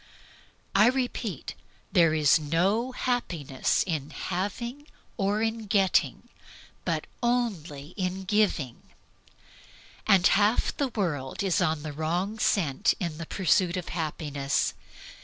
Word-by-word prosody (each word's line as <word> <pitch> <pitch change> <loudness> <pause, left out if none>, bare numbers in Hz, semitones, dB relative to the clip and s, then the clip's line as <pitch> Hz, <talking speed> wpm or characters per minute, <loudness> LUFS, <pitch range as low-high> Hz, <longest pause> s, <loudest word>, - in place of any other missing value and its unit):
I 205 +3 +6
repeat, 245 - -2 0.4
there 165 -2 +4
is 155 +1 +5
no 190 - +1
happiness 175 - 0
in 155 -6 -3
having 235 - -4 0.3
or 205 +1 0
in 225 -1 -2
getting, 195 -2 +2 0.6
but - - -1 0.2
only 195 - -1
in 185 0 -3
giving. 190 - 0 1.3
Half 200 +3 +4
the 280 - +1
world 165 - -2
is 190 -3 +1
on 155 -1 0
the 155 -2 -5
wrong 175 +8 -2
scent 155 -11 +2
in 170 -3 -3
pursuit 185 0 +2
of 180 - -5
happiness. 150 -4 -1
185 Hz, 105 wpm, -27 LUFS, 155-215 Hz, 1.3 s, I